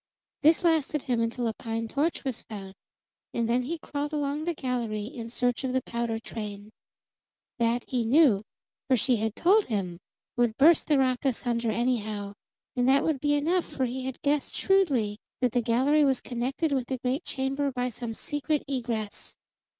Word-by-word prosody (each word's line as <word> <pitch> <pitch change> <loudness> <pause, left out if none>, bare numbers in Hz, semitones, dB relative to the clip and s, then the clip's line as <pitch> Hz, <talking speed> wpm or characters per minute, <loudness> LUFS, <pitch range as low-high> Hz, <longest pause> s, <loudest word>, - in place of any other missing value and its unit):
This 315 +4 +5
lasted 315 -3 +2
him 245 -4 0
until 230 +1 -1
a 225 - -1
pine 225 +1 -4
torch 290 +8 -1
was 265 -4 -3
found, 195 -3 -8 0.6
and 235 -1 +1
then 240 +2 +2
he 315 +7 -3
crawled 295 -1 -4
along 295 +1 -1
the 345 -1 -1
gallery 240 -6 -2
in 230 0 -7
search 245 +1 0
of 260 -1 -1
the 260 -1 +1
powder 235 -1 -2
train. 210 -2 -7 0.9
That, 235 +1 +2
he 250 -2 0
knew, 245 -4 +5 0.5
for 260 -2 +4
she 250 +1 +2
had 220 0 -1
told 405 +5 +4
him, 185 -6 -3 0.4
would 240 -2 +1
burst 310 +3 +6
the 295 - +4
rock 255 -2 +1
asunder 240 -3 0
anyhow; 215 -3 -1 0.4
and 250 0 +2
that 275 +1 +5
would 315 -4 0
be 290 +1 +2
enough, 335 +5 +1
for 260 - -2
he 255 +1 -4
had 265 -1 -5
guessed 290 -1 0
shrewdly 270 - +2 0.2
that 250 -2 +2
the 245 - +2
gallery 260 +6 +3
was 270 -3 +3
connected 260 +6 -2
with 260 -3 0
the 260 - -2
great 255 +6 -1
chamber 275 +1 -1
by 250 -1 -1
some 235 -1 -6
secret 290 +3 -1
egress. 235 -6 -3
250 Hz, 180 wpm, -28 LUFS, 230-285 Hz, 0.9 s, burst